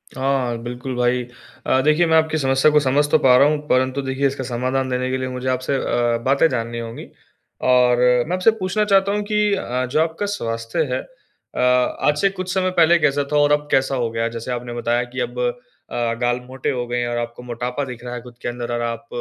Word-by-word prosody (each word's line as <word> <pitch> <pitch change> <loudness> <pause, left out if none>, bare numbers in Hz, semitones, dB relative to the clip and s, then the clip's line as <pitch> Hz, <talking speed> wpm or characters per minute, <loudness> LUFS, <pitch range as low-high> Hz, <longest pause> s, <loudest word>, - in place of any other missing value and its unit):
हाँ, 130 -3 0
बिल्कुल 125 +2 -5
भाई। 125 0 +1 0.4
अ, 130 - +2
देखिए 155 +4 +3
मैं 160 0 +4
आपकी 160 0 +1
समस्या 135 +1 +3
को 150 - +5
समझ 145 +1 +2
तो - - +6
पा 125 -2 +5
रहा 140 - +6
हूँ 150 0 +1
परंतु 130 +2 +1
देखिए 135 +1 0
इसका 135 -1 -4
समाधान 130 +2 -2
देने 125 0 -1
के 130 - 0
लिए 130 0 -3
मुझे 125 0 -5
आपसे 130 +2 -1
अ, 120 -2 0
बातें 140 +4 +4
जाननी 115 -1 -3
होंगी। 115 0 -7 0.6
और 125 -1 +4 0.3
मैं 175 - -2
आपसे 185 +5 +4
पूछना 190 +3 0
चाहता 195 -1 +3
हूँ 210 0 -1
कि 210 -1 +2
अ, 130 -8 -2
जो 145 +5 -1
आपका 165 +5 -1
स्वास्थ्य 115 - -2
है, - - 0
अ, - - -15
आज 125 +4 +2
से 195 - +4
कुछ 185 -1 -5
समय 185 -1 +1
पहले 170 +1 +6
कैसा 145 -1 +2
था 150 - +2
और 145 0 +4
अब 150 0 +1
कैसा 135 0 +2
हो 120 -2 -1
गया? 115 0 -1
जैसे 115 +2 -6
आपने 120 0 -4
बताया 120 0 0
कि 125 +2 -8
अब - - -9 0.5
अ, 115 -1 -1
गाल 120 0 +1
मोटे 130 +1 -4
हो 125 -2 -2
गए 120 0 -2
हैं 120 - -1
और 120 - -2
आपको 120 +1 -5
मोटापा 125 +3 -4
दिख 125 -2 -9
रहा 125 0 -6
है 120 - -5
खुद 120 -1 -14
के - - -4
अंदर 120 0 -5
और 120 - -1
आप 115 0 -4
130 Hz, 230 wpm, -21 LUFS, 120-150 Hz, 0.6 s, तो